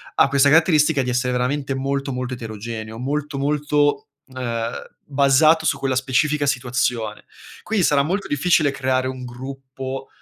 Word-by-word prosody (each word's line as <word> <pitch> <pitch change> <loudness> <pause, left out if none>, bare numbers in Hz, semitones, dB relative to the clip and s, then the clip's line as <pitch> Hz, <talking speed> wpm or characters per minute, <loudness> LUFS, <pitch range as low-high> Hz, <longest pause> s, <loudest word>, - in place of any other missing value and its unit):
ha - - +5
questa 140 0 +4
caratteristica 155 -2 +4
di 125 - -3
essere 125 +1 0
veramente 135 +3 -1
molto 140 +1 -2
molto 125 0 -3
eterogeneo, 110 -1 -7
molto 145 +2 -3
molto, 145 +1 0 0.2
uhm, 120 -3 -3 0.3
basato 145 +3 +4
su 140 - +1
quella 135 -1 -1
specifica 140 +3 +1
situazione. 125 -5 -1 0.4
Quindi 220 -3 0
sarà 145 -3 +3
molto 195 +6 -2
difficile 145 0 +2
creare 130 -1 0
un 130 -1 -6
gruppo, 130 +1 -7
135 Hz, 140 wpm, -21 LUFS, 125-145 Hz, 0.4 s, ha